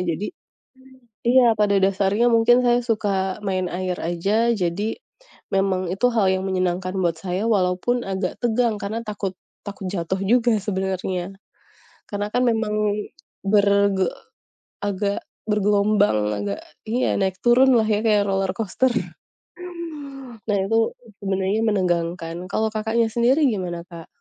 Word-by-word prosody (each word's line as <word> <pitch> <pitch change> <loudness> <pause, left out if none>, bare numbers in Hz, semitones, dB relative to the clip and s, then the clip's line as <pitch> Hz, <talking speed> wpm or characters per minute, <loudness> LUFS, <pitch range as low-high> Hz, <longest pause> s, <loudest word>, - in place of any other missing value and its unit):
jadi 200 +7 -4 1.0
iya 250 +1 +6
pada 205 -1 +3
dasarnya 195 +4 +2
mungkin 235 +2 +5
saya 240 0 +4
suka 200 -5 -1
main 185 -2 0
air 185 0 -2
aja. 200 +8 +1
Jadi, 205 - -1 0.5
memang 190 -2 +1
itu 195 +6 +2
hal 215 -4 +3
yang 190 0 -1
menyenangkan 185 -1 -1
buat 170 -3 0
saya 185 +3 -2
walaupun 200 +5 +1
agak 190 -1 -2
tegang 235 -1 +2
karena 215 +3 -3
takut 205 -3 -4 0.3
takut 200 -1 -7
jatuh 190 0 -2
juga 235 +3 +3
sebenernya. 190 -2 -2 0.8
Karena 205 0 -2
kan, 245 - +2
memang 225 -2 +1 0.7
berge 200 -1 +3 0.7
agak 200 0 -1 0.3
bergelombang, 205 - +2
agak 100 0 -3 0.3
iya 240 +3 +1
naik 190 -1 0
turun 255 +2 +6
lah 220 - +3
ya 210 -1 +1
kayak 210 -2 +4
roller 195 -1 0
coaster. 225 +4 +1 1.6
Nah, 205 -2 +1
itu 225 - 0 0.5
sebenarnya 195 +2 0
menegangkan. 175 -5 0 0.2
Kalau 220 - +1
Kakaknya, 220 +1 0
sendiri 245 +6 +3
gimana 185 -7 -2
Kak? 170 -3 -11
200 Hz, 125 wpm, -22 LUFS, 185-220 Hz, 1.6 s, iya